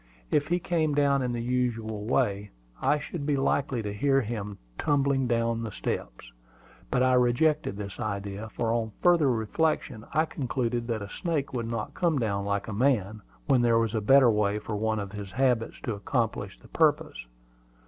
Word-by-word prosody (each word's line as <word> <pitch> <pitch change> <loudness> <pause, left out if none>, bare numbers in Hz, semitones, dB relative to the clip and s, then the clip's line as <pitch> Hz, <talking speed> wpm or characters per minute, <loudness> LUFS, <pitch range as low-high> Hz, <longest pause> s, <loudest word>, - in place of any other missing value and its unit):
If 145 -1 +2
he 175 - +2
came 160 -4 0
down 140 -1 +3
in 125 -1 -1
the 120 -1 -3
usual 115 -4 -1
way, 105 -4 0 0.3
I 150 - +3
should 150 +1 -6
be 145 -1 +1
likely 135 -3 0
to 105 -1 -3
hear 135 +5 +2
him 105 -3 -5 0.2
tumbling 140 -2 +2
down 115 -1 0
the 115 -2 -4
steps. - - -5 0.6
But 125 - +2
I 130 0 +4
rejected 125 -2 +2
this 100 -1 -7
idea; 100 -1 -4
for 115 0 -1
on 110 -2 -1
further 170 -5 +5
reflection 120 +1 0
I 155 +2 +2
concluded 120 -5 -2
that 110 -3 -2
a - - -6
snake 145 - -2
would 120 -2 -2
not 115 -2 -4
come 170 -4 +1
down 100 -5 -1
like 100 0 -1
a 110 - -4
man, 110 -3 +1 0.2
when 130 - +3
there 120 -1 +4
was 115 -1 +1
a 110 - 0
better 130 +2 +6
way 105 -1 +1
for 105 0 -5
one 110 +1 0
of 100 -2 -4
his 100 -2 -7
habits 125 -4 +1
to 115 - -2
accomplish 100 -1 -2
the - - -18
purpose. - - +1
115 Hz, 185 wpm, -27 LUFS, 105-135 Hz, 0.6 s, better